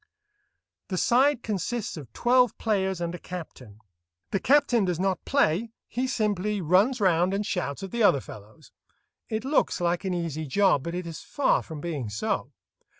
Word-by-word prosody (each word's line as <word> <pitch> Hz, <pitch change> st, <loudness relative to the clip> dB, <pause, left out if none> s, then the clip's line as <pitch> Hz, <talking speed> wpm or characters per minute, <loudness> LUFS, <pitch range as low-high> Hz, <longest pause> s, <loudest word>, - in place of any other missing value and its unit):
The 190 Hz, -3 st, -3 dB
side 255 Hz, +5 st, +3 dB
consists 215 Hz, +2 st, -3 dB
of 140 Hz, -8 st, -10 dB
twelve 250 Hz, -, +3 dB
players 190 Hz, -4 st, 0 dB
and 170 Hz, 0 st, -2 dB
a 175 Hz, -, -6 dB
captain. 135 Hz, -, -9 dB, 0.5 s
The 195 Hz, -, +1 dB
captain 250 Hz, -2 st, +3 dB
does 180 Hz, -3 st, -1 dB
not 190 Hz, 0 st, 0 dB
play; 225 Hz, -, +1 dB
he 255 Hz, +2 st, -2 dB
simply 210 Hz, -4 st, 0 dB
runs 195 Hz, -, +3 dB
round 185 Hz, -1 st, +3 dB
and 205 Hz, +1 st, -1 dB
shouts 140 Hz, -2 st, -3 dB
at 195 Hz, -, -6 dB
the 235 Hz, -, -2 dB
other 175 Hz, -10 st, +5 dB
fellows. 105 Hz, -3 st, -13 dB, 0.6 s
It 220 Hz, +2 st, -3 dB
looks 280 Hz, +2 st, +1 dB
like 175 Hz, +2 st, 0 dB
an 190 Hz, -2 st, -1 dB
easy 160 Hz, -3 st, -3 dB
job, 190 Hz, -1 st, +3 dB
but 170 Hz, +4 st, -5 dB
it 180 Hz, 0 st, -4 dB
is 165 Hz, -2 st, -7 dB
far 285 Hz, -, +1 dB
from 155 Hz, -3 st, -8 dB
being 145 Hz, -9 st, -4 dB
so. 105 Hz, +1 st, -2 dB
190 Hz, 170 wpm, -26 LUFS, 165-225 Hz, 0.6 s, other